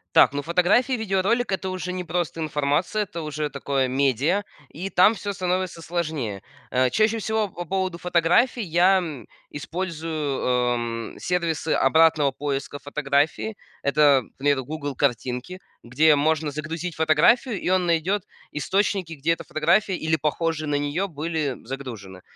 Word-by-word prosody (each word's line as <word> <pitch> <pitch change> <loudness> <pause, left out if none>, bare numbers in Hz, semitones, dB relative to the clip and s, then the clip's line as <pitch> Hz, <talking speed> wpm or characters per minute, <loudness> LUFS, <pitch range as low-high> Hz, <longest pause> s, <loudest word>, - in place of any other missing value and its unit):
Так, - - +7
ну, 145 +1 -3
фотографии, 180 - +2
видеоролик- 220 +1 0
это 190 0 -2
уже 185 0 -4
не 180 0 -4
просто 170 -1 -2
информация, 150 +6 0
это 170 -4 -7
уже 150 -1 -3
такое 140 -2 -1
медиа. 140 - +1 0.2
И 185 +5 -6
там 190 +4 +5
всё 205 -2 -4
становится 185 -2 -2
сложнее. 155 - -3 0.3
Э, 130 0 +3
чаще 215 - +2
всего, 220 -1 -1
по 175 -1 -7
поводу 185 0 -2
фотографий 180 +9 +2
я, 180 +2 +4
м, 150 - -6 0.2
использую, 160 -2 -3
эм, 120 -2 -1
сервисы 170 -3 -1
обратного 155 0 +4
поиска 140 0 -4
фотографии. 145 +8 -1 0.3
Это, 140 -1 +4
например, 135 +3 -1
"Гугл 145 0 -5
Картинки", 125 +6 -2 0.2
где 150 +6 +4
можно 155 +1 +1
загрузить 160 +3 -5
фотографию, 175 - +3
и - - -1
он 185 -1 +2
найдет 175 +4 +1 0.3
источники, 190 +2 0
где 155 +2 0
эта 165 - -7
фотография, 170 +6 +1
или 160 0 0
похожие 155 0 -1
на 145 - 0
нее, 145 +7 -1
были 155 -4 -2
загружены. 115 -8 -7
160 Hz, 140 wpm, -24 LUFS, 140-180 Hz, 0.3 s, Так